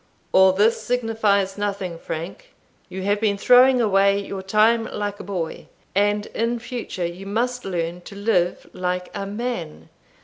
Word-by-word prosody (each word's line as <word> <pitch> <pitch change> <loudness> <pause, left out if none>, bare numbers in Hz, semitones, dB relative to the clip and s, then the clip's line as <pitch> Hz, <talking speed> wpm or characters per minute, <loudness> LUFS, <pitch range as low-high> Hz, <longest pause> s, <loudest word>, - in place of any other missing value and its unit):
"All 190 0 +6
this 210 +5 +2
signifies 215 -5 0
nothing, 195 -4 -3
Frank; 170 - -7 0.3
you 190 0 -6
have 205 +1 +1
been 205 -2 +1
throwing 250 +4 +6
away 200 -3 +3
your 195 -1 -5
time 215 +4 +3
like 205 -1 -4
a - - -7
boy, 180 -5 -4 0.3
and 205 +1 +2
in 230 +1 0
future 230 -6 -5
you 175 +3 -6
must 245 +4 -1
learn 175 -2 -3
to 200 - -10
live 200 -4 0
like 180 0 -3
a 200 -1 -4
man. 205 - -5
200 Hz, 150 wpm, -22 LUFS, 190-225 Hz, 0.3 s, All